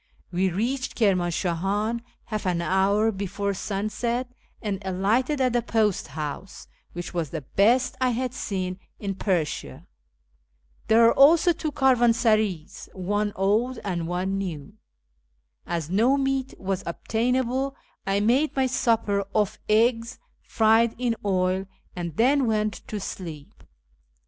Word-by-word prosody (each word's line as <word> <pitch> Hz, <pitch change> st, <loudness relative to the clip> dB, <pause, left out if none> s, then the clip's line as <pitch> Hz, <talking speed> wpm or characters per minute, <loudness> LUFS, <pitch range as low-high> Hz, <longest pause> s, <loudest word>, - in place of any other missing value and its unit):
"We 185 Hz, +2 st, +1 dB
reached 245 Hz, +8 st, -2 dB
Kirmanshahan 195 Hz, +2 st, 0 dB, 0.2 s
half 215 Hz, -3 st, -3 dB
an 175 Hz, -2 st, +1 dB
hour 195 Hz, +5 st, +2 dB
before 200 Hz, 0 st, -3 dB
sunset, 215 Hz, +6 st, -2 dB, 0.3 s
and 205 Hz, -3 st, -3 dB
alighted 215 Hz, +10 st, 0 dB
at 255 Hz, -2 st, +2 dB
the 240 Hz, -, +2 dB
post 220 Hz, -4 st, 0 dB
house, 155 Hz, +5 st, -6 dB, 0.3 s
which 175 Hz, +1 st, -6 dB
was 170 Hz, -4 st, -2 dB
the 160 Hz, +1 st, -5 dB
best 230 Hz, -, +2 dB
I 255 Hz, -, +3 dB
had 250 Hz, +1 st, -2 dB
seen 185 Hz, -6 st, -3 dB, 0.2 s
in 200 Hz, -2 st, -3 dB
Persia. 170 Hz, -, -2 dB, 1.0 s
There 225 Hz, +1 st, +6 dB
are 230 Hz, -, +6 dB
also 325 Hz, +5 st, +6 dB
two 315 Hz, -1 st, -4 dB
caravansarays, 230 Hz, -, +2 dB
one 205 Hz, +3 st, -1 dB
old 220 Hz, +6 st, +1 dB
and 175 Hz, -4 st, -2 dB
one 185 Hz, +3 st, -1 dB
new. 175 Hz, -2 st, -5 dB, 0.9 s
As 165 Hz, -2 st, -3 dB
no 235 Hz, +8 st, +3 dB
meat 270 Hz, -1 st, -1 dB
was 195 Hz, -1 st, -2 dB
obtainable, 250 Hz, +8 st, -1 dB, 0.3 s
I 195 Hz, +1 st, +1 dB
made 255 Hz, +8 st, +2 dB
my 265 Hz, -1 st, +2 dB
supper 225 Hz, -5 st, +1 dB
off 210 Hz, 0 st, +1 dB
eggs 230 Hz, +2 st, +2 dB, 0.2 s
fried 225 Hz, +1 st, +3 dB
in 240 Hz, -1 st, 0 dB
oil, 185 Hz, -1 st, 0 dB, 0.3 s
and 170 Hz, -3 st, -5 dB
then 265 Hz, +2 st, +3 dB
went 215 Hz, -1 st, 0 dB
to 210 Hz, -, -4 dB
sleep. 165 Hz, -6 st, -8 dB
210 Hz, 130 wpm, -25 LUFS, 185-240 Hz, 1.0 s, There